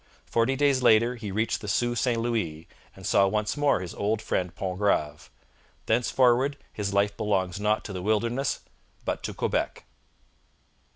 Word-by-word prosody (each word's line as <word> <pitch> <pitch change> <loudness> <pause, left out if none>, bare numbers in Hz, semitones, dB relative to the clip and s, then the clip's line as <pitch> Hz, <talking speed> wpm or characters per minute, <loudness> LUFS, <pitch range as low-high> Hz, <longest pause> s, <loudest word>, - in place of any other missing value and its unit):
Forty 115 +3 +1
days 140 -1 +2
later 115 +1 +4
he 110 -4 -6
reached 110 +4 -1
the 105 - -7
Sault 120 +4 0
St 120 -2 +1
Louis, 95 -10 -2 0.3
and 95 - -11
saw 100 0 +4
once 105 +2 -1
more 145 -9 +2
his 90 - -6
old 105 +2 -1
friend 90 -5 -2
Pontgrave. 90 -6 -1 0.6
Thenceforward 125 +4 +2 0.2
his 100 -2 -3
life 100 0 +1
belongs 100 -4 -1
not 105 +1 0
to 100 - -6
the 90 - -4
wilderness, 115 +6 0 0.4
but - - -2
to - - -4
Quebec. - - -2
110 Hz, 155 wpm, -27 LUFS, 100-120 Hz, 0.6 s, later